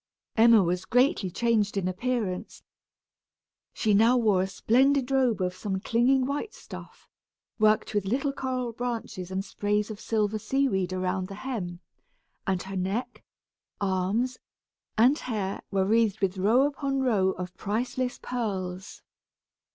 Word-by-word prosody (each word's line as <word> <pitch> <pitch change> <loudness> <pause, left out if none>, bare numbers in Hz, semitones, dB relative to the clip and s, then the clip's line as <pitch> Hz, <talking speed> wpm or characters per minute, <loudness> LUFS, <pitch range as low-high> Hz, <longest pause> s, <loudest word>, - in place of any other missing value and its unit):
Emma 225 -2 +6
was 180 +1 -1
greatly 250 - +2
changed 215 0 +1
in 185 -2 0
appearance. 205 -1 -3 1.1
She 215 -2 +1
now 225 +5 +5
wore 210 -6 +3
a 190 - 0
splendid 265 +6 +2
robe 255 -6 +2
of 180 0 0
some 190 0 -3
clinging 250 +5 +2
white 290 +11 -3
stuff, - - -11 0.5
worked 215 0 +3
with 205 -2 0
little 275 +6 0
coral 255 -3 -3
branches 230 -6 -4
and 190 +1 -3
sprays 210 +1 -1
of 210 - -8
silver 215 -1 0
seaweed 215 -5 0
around 185 0 -1
the 195 - -8
hem, 195 -7 -5 0.7
and 190 -2 0
her 195 +1 -7
neck, 190 +6 -3 0.6
arms, 200 +6 0 0.6
and 250 +7 +5
hair 205 -5 -3
were 195 -1 +1
wreathed 215 0 +2
with 195 -1 0
row 225 +8 +4
upon 275 -1 -1
row 200 -7 +2
of 180 0 -7
priceless 245 +4 -2
pearls. 190 -6 -4
215 Hz, 135 wpm, -27 LUFS, 190-250 Hz, 1.1 s, Emma